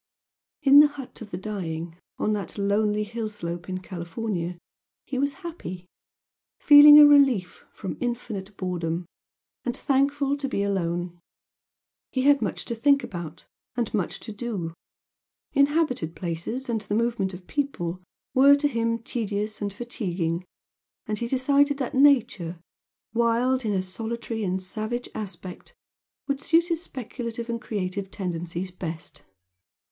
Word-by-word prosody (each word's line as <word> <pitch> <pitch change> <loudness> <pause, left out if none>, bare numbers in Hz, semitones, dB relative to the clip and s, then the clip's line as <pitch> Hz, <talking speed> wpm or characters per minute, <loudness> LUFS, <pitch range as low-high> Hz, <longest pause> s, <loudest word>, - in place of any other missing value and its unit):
In 280 +1 +9
the 300 - +9
"hut 285 -5 -10
of 215 - -8
the 175 - -4
dying" 175 -5 -4 0.2
on 215 - +1
that 200 -3 -4
lonely 210 +1 +1
hill 220 +1 -4
slope 175 -4 -5
in 185 0 -3
California 175 0 -4 0.5
he 260 - -3
was 280 +1 0
happy, 185 - -6 0.7
feeling 295 0 +10
a 300 - +11
relief 270 -11 +4
from 190 - -6
infinite 215 -5 -4
boredom, 175 -2 -2 0.6
and 245 - -2
thankful 280 +1 +1
to 280 -1 -3
be 200 - 0
alone. 175 -3 -2 0.9
He 260 - 0
had 285 -1 +5
much 205 - -2
to - - -2
think 280 +4 +3
about 170 -7 -7 0.3
and 235 -3 -2
much 200 -5 -1
to 225 - -7
do 205 -7 -4 0.8
inhabited 280 - +2
places 180 +10 -4
and 230 -3 -1
the 205 0 -3
movement 225 -5 0
of 180 0 -12
people 185 -12 -2 0.3
were 275 +2 +7
to 290 +1 +1
him 230 -3 0
tedious 215 -2 -3
and 205 -1 -1
fatiguing, 185 -7 -3 0.6
and 215 -1 -3
he 235 - -2
decided 280 +3 +3
that 260 -3 -3
nature, 235 - +3 0.5
wild 235 +2 +2
nature - - 0
in 210 - +1
a 185 - 0
solitary 225 +3 -4
and 185 -1 -1
savage 215 +6 -4
aspect, 190 -3 -8 0.5
would 280 0 -1
suit 335 +3 +3
his 335 -1 0
speculative 235 -4 -5
and 230 0 -3
creative 195 -3 -3
tendencies 175 -1 -4
best. 165 -3 -6
215 Hz, 140 wpm, -26 LUFS, 185-260 Hz, 0.9 s, a